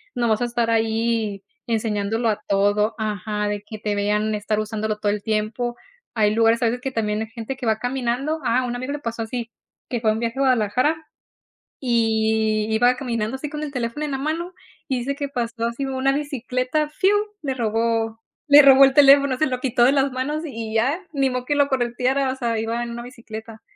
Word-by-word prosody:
no 240 -1 +1
vas 220 +1 +1
a - - +2
estar 235 -1 -1
ahí 225 -2 0 0.2
enseñándolo 225 0 0
a 210 - -1
todo 205 +2 +2
ajá, 210 -1 -2
de 205 0 -3
que 215 - -7
te 210 -1 -2
vean 210 +1 0
estar 210 +1 -1
usándolo 215 0 -3
todo 205 -1 +1
el 205 0 -2
tiempo. 220 +3 -1 0.4
Hay 210 -2 +3
lugares, 230 +1 +3
a - - +4
veces, 240 +2 -1
que 270 - -3
también 215 -3 -1
hay 220 - -3
gente 230 +2 -6
que 260 - -6
va 220 -1 +1
caminando 255 +5 -1
a 250 +2 +2
un 245 0 -3
amigo 255 +3 -4
le 290 - -4
pasó 230 -3 -4
así, 230 +1 -5 0.4
que 240 - -1
fue 220 -2 +3
un 220 - -3
viaje 235 +2 -3
a - - +2
Guadalajara 255 +4 +2 0.8
y 220 -3 +1
iba 245 +3 +4
caminando 230 -2 -2
así, 265 +3 -5
con 300 -1 -5
el 295 - -4
teléfono 250 +3 -3
en 295 - -4
la 270 - -1
mano, 325 +5 -3 0.3
y 260 - 0
dice 275 +3 -2
que 285 0 -4
pasó 235 -3 -3
así, 235 +4 -3
una 270 0 0
bicicleta, 275 0 -1
fiu 375 +6 +2 0.3
le 270 -2 -1
robó 225 -1 -1 0.3
le 290 0 +9
robó 275 -1 +8
el 270 - +2
teléfono, 280 -1 +6
se 310 - +2
lo 255 -1 -2
quitó 250 -2 +2
de 260 - +5
las 275 -1 +2
manos 290 +5 -2
y 225 -6 -5
ya, 260 +9 +2
ni 270 -2 +1
modo 250 0 -3
que 290 - 0
lo 285 -1 +3
correteara, 260 +1 0
o - - -4
sea, 235 -3 -1
iba 230 +2 -2
en 235 - -5
una 235 0 -6
bicicleta. 225 -2 -10
235 Hz, 210 wpm, -22 LUFS, 220-265 Hz, 0.8 s, le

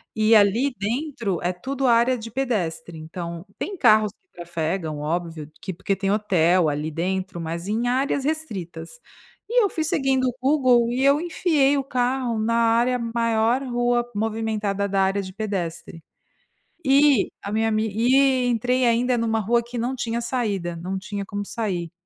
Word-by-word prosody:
e 220 +1 +4
ali 220 +7 +4
dentro 230 - -2
é 175 - 0
tudo 265 +8 -3
área 240 +2 +4
de 225 0 -8
pedestre. 175 -11 -2
Então 170 +2 -7
tem 395 - -4
carros 215 -5 +4
que 375 - -48
trafegam, 165 -2 -3
óbvio 160 -1 -3
que 190 - -5
porque 195 +2 -2
tem 195 0 -1
hotel 180 -5 +3
ali 150 +2 -2
dentro, 185 +2 -3
mas 170 +3 -5
em 225 +3 -1
áreas 270 +2 0
restritas, 215 - -4 0.5
e 485 -1 +4
eu 400 - +2
fui 315 - -2
seguindo 270 -6 +1
o 250 - -1
Google 255 -4 +3
e 260 +2 0
eu 280 +3 +4
enfiei 305 -5 +2
o 275 - -1
carro 250 -3 -1
na 230 +1 0
área 235 +2 +3
maior 230 +1 +1
rua 240 -1 0
movimentada 215 -2 -1
da 195 0 +1
área 195 +1 +1
de 185 -1 -8
pedestre. 180 -6 -5 0.8
E 275 -4 +4
a 200 - -5
minha 225 +1 +1
ami 215 0 0
e 255 +3 +3
entrei 250 +2 +1
ainda 240 +1 +2
numa 225 -1 0
rua 235 +3 +2
que 240 +1 -8
não 245 +3 -1
tinha 235 -1 -2
saída, 205 -9 -2
não 185 +3 -4
tinha 200 +1 -5
como 205 0 -5
sair. 185 -8 -3
225 Hz, 165 wpm, -23 LUFS, 190-250 Hz, 0.8 s, e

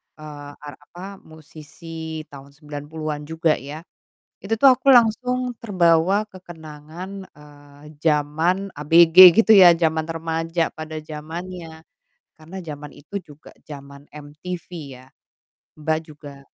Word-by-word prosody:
eee, 145 -2 -10
ar 145 -1 -11
apa, 185 +6 -11
musisi 160 +1 -10
tahun 140 0 -14
90-an 150 0 -7
juga 160 -1 0
ya. 145 +4 -9 0.6
Itu 225 +3 -2
tuh 265 +1 +7
aku 270 +2 +1
langsung 250 +1 +2
terbawa 185 0 +2
kekenangan, 165 -2 -11 0.3
eee, 145 0 -17 0.2
jaman 160 +5 0
ABG 165 +4 +8
gitu 220 -1 +6
ya, 185 -3 +9
jaman 160 -1 +1
remaja 165 +1 -2
pada 155 0 -7
zamannya 160 +2 -9 0.5
karena 160 +4 -11
jaman 150 -3 -9
itu 175 +8 -8
juga 150 0 -16 0.2
jaman 140 -1 -12
MTV 150 +4 -9 0.3
ya. 130 - -18 0.7
Mbak 155 +1 -1
juga 145 -2 -13
160 Hz, 115 wpm, -21 LUFS, 150-180 Hz, 0.7 s, ya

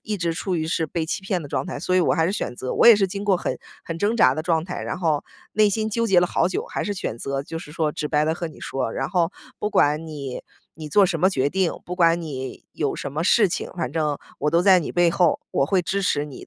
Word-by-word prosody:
一 215 -1 -3
直 170 -2 -1
处 180 +1 -2
于 160 0 -1
是 160 0 0
被 160 +2 -2
欺 160 - -3
骗 190 -4 -2
的 - - -7
状 - - -2
态。 180 - -5
所 185 - -1
以 185 - +5
我 175 - +2
还 160 - +2
是 190 - 0
选 125 - -3
择 130 - -4
我 - - +4
也 230 -3 +10
是 195 -2 +2
经 200 +2 -5
过 195 -3 +3
很 - - -3 0.3
很 165 0 -5
挣 210 +5 +1
扎 - - +5
的 155 - -3
状 165 -2 +1
态， 180 - -5
然 - - -3
后 155 -5 +1 0.3
内 215 -1 +4
心 220 +2 -1
纠 230 +2 0
结 185 -4 +5
了 180 - +3
好 170 0 +1
久， - - -3
还 - - -3
是 205 - -2
选 120 - -4
择 135 +1 -3
就 165 +3 -6
是 150 - -10
说 155 -1 -1
直 150 - -3
白 150 0 +2
地 160 +1 +1
和 170 -1 -4
你 155 - -14
说。 130 -4 -3
然 - - -3
后 175 -2 +2 0.3
不 210 - -1
管 150 -3 +2
你 140 -4 -6 0.3
你 155 -1 -8
做 200 +6 +5
什 175 -4 -1
么 185 - +5
决 140 -6 0
定， 190 0 +1
不 180 - -5
管 170 -1 +4
你 130 -4 -6
有 145 -3 -2
什 140 - -5
么 155 +3 -2
事 210 +3 +4
情， 170 - -4
反 170 - -3
正 150 -3 0 0.2
我 150 - 0
都 170 +2 +3
在 190 -1 +6
你 165 - -4
背 175 -1 +3
后， 175 -2 +2
我 135 - +1
会 185 +1 +2
支 200 +3 -1
持 145 -5 +1
你 145 -3 -10
170 Hz, 305 characters per minute, -23 LUFS, 150-190 Hz, 0.3 s, 也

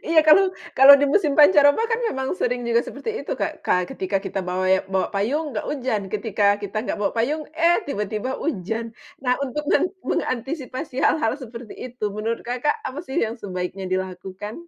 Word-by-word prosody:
Iya, 330 0 +3
kalau 310 +6 +8 0.3
kalau 270 +2 +10
di 285 - +3
musim 310 -8 +3
pancaroba 290 +4 +6
kan 455 - +1
memang 265 -5 -3
sering 245 0 0
juga 235 0 +3
seperti 280 - -6
itu, - - -4
Kak. - - -3 0.3
Ketika 190 +1 -2
kita 195 - -3
bawa 185 +1 -1
ya 190 0 +4
bawa 190 -1 +1
payung, 260 +11 0
nggak 210 - -3
hujan, 255 -7 -1
ketika 210 -1 -1 0.2
kita 200 +1 -6
nggak - - -3
bawa 200 - 0
payung, 285 +7 0
eh 335 +2 +4
tiba-tiba 210 -1 -3
hujan. 225 - -2 0.4
Nah, 250 -1 +2
untuk 295 +3 -4
meng 325 - +4 0.2
mengantisipasi 260 +2 -3
hal-hal 225 -8 +2
seperti 235 -4 -9
itu, 250 -3 -6
menurut 225 +2 -2
Kakak, 250 +4 -1
apa 260 - -5
sih 265 - -6
yang 225 +2 -4
sebaiknya 185 -1 -5
dilakukan? 190 +2 -4
240 Hz, 175 wpm, -23 LUFS, 205-285 Hz, 0.4 s, kalau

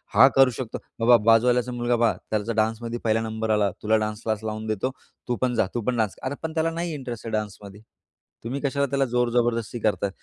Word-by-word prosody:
हा 130 - +9
करू 135 -1 +6
शकतो, 125 -4 -4 0.2
बाबा 120 +1 +6
बाजूवाल्याचा 120 +2 +4
मुलगा 120 0 0
पहा, 115 -1 +3 0.2
त्याचा 110 +1 -1
डान्समध्ये 115 +2 -1
पहिला 110 0 +2
नंबर 110 0 -3
आला 105 -2 +2
तुला 110 +1 +3
डान्स 105 0 -5
क्लास 110 -1 -2
लावून 110 0 -4
देतो, 110 +4 -1 0.4
तू 125 - 0
पण 125 -1 +1
जा - - +2
तू 120 - -1
पण 125 -2 +1
डान्स. 110 -3 0
आता 130 +2 -2
पण 160 0 -3
त्याला 165 0 +1
नाही 170 0 -3
इंटरेस्ट 125 -6 -6
आहे - - -4
डान्समध्ये. 105 -1 -5 0.6
तुम्ही 125 +5 -3
कशाला 140 0 0
त्याला 135 +1 +1
जोर 125 -1 +1
जबरदस्ती 120 -1 0
करता. 105 -2 0
115 Hz, 210 wpm, -25 LUFS, 110-125 Hz, 0.6 s, हा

